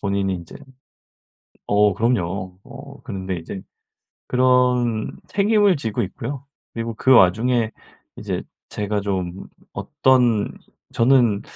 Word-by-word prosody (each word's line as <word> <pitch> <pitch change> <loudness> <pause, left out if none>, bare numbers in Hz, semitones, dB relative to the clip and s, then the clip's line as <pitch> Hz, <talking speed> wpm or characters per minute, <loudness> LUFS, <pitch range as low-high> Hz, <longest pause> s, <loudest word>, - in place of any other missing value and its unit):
본인이 100 -1 0
인제 85 -2 -9 1.1
어 105 -1 +4
그럼요. 95 -4 -1
어 140 +1 -12
그런데 95 -6 -4
이제 90 +3 -7 0.7
그런 125 -3 +2 0.2
책임을 205 -2 +3
지고 110 -7 -2
있고요. 135 +8 -5 0.3
그리고 115 0 -4
그 130 +4 +3
와중에 115 +3 +4 0.5
이제 - - -4 0.3
제가 105 0 -2
좀 95 -2 -3 0.3
어떤 125 -5 +2 0.4
저는 115 -4 +3
110 Hz, 215 characters per minute, -21 LUFS, 100-125 Hz, 1.1 s, 어